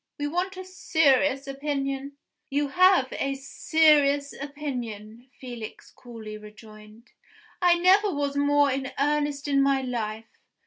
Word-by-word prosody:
We 290 - -3
want 360 +5 -2
a 375 - -7
serious 290 -6 +1
opinion." 275 0 -4 0.4
"You 285 +1 -1
have 365 -5 +4
a 275 0 -2
serious 285 0 +2
opinion," 250 -5 -7
Felix 240 -4 -9
coolly 220 -3 -10
rejoined. 215 +1 -15 0.5
"I 350 -1 +4
never 385 +4 +4
was 285 -2 -2
more 285 0 +3
in 265 0 -4
earnest 290 0 -1
in 275 -1 +2
my 275 -1 +2
life. 225 -3 -5
275 Hz, 125 wpm, -26 LUFS, 250-295 Hz, 0.5 s, have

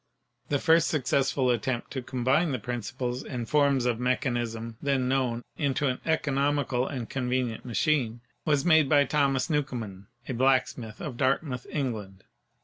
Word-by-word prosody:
The 145 - +2
first 165 +3 +4
successful 135 -2 +1
attempt 120 +1 -2
to 130 - -3
combine 130 +6 +1
the - - 0
principles 125 +2 -4
and 120 -4 -5
forms 140 -3 +3
of 120 -2 0
mechanism 120 -3 -1
then 135 -3 +1
known 125 -3 0
into 145 -1 0
an 125 - -3
economical 140 -4 +1
and 125 -5 -4
convenient 125 -3 -2
machine 120 -2 0 0.2
was 145 -3 +1
made 160 -5 +5
by 145 -2 +5
Thomas 135 -2 +1
Newcomen, 120 - -3 0.2
a - - -2
blacksmith 125 -3 +1
of 130 -6 -5
Dartmouth, 130 -1 0
England. 105 -9 -4
130 Hz, 140 wpm, -28 LUFS, 120-140 Hz, 0.2 s, made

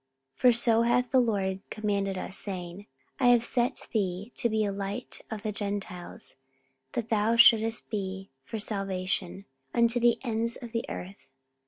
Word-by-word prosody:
44:013:047 - - -33
For 250 - +7
so 230 -1 +4
hath 240 +1 +2
the 260 - +5
Lord 195 -5 0
commanded 200 -3 -1
us, 190 - -5
saying, 185 0 -6 0.3
I 255 - +4
have 240 -1 +6
set 245 +2 0
thee 200 0 -1
to 235 - +1
be 215 -1 +1
a 200 - -1
light 200 +4 -5
of 220 -2 -6
the 215 - -1
Gentiles, 200 -6 -4 0.6
that 230 -1 -3
thou 220 +1 +2
shouldest 225 -1 +5
be 195 -2 -4
for 225 - -5
salvation 195 -2 -2 0.3
unto 235 +1 +3
the 240 0 +4
ends 230 -1 0
of 240 -2 -9
the 230 0 -2
earth. 195 +2 -8
215 Hz, 165 wpm, -28 LUFS, 195-235 Hz, 0.6 s, For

